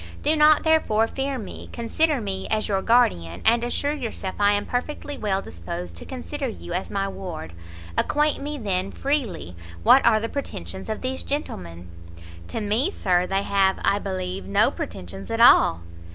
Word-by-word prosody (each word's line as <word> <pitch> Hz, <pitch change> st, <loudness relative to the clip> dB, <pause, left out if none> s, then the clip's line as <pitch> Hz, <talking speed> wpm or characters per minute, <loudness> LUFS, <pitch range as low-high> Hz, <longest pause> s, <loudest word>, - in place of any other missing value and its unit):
Do 310 Hz, -, +4 dB
not, 305 Hz, 0 st, +6 dB
therefore, 310 Hz, -9 st, +3 dB
fear 270 Hz, +2 st, -3 dB
me; 215 Hz, -6 st, -8 dB
consider 280 Hz, +5 st, +1 dB
me 195 Hz, -3 st, -3 dB
as 215 Hz, 0 st, 0 dB
your 195 Hz, -2 st, 0 dB
guardian, 90 Hz, -, +2 dB
and 235 Hz, +1 st, +4 dB
assure 285 Hz, +4 st, -1 dB
yourself 225 Hz, -9 st, -4 dB
I 205 Hz, 0 st, +4 dB
am 205 Hz, -, 0 dB
perfectly 285 Hz, +3 st, -3 dB
well 195 Hz, -4 st, -1 dB
disposed 85 Hz, 0 st, -7 dB
to -, -, -9 dB
consider 270 Hz, +2 st, -4 dB
you 190 Hz, -6 st, -7 dB
as 180 Hz, +2 st, -2 dB
my 195 Hz, 0 st, -1 dB
ward. 175 Hz, -, -7 dB, 0.4 s
Acquaint 300 Hz, 0 st, +1 dB
me, 295 Hz, +1 st, -4 dB
then, 195 Hz, -5 st, -1 dB
freely, 235 Hz, -, -2 dB, 0.3 s
what 270 Hz, -, +7 dB
are 215 Hz, -, +5 dB
the 225 Hz, -, -2 dB
pretensions 95 Hz, -, -6 dB
of 215 Hz, -, -3 dB
these 260 Hz, +1 st, -2 dB
gentlemen?" 90 Hz, -, -5 dB, 0.6 s
"To -, -, -4 dB
me, 220 Hz, -, +1 dB
Sir, 180 Hz, -, +1 dB
they 195 Hz, +1 st, 0 dB
have, 195 Hz, -1 st, +2 dB
I 200 Hz, -, +3 dB
believe, 185 Hz, -, -4 dB
no 100 Hz, -, +3 dB
pretensions 95 Hz, +1 st, -7 dB
at -, -, -2 dB
all." 85 Hz, 0 st, +6 dB
205 Hz, 170 wpm, -24 LUFS, 180-270 Hz, 0.6 s, what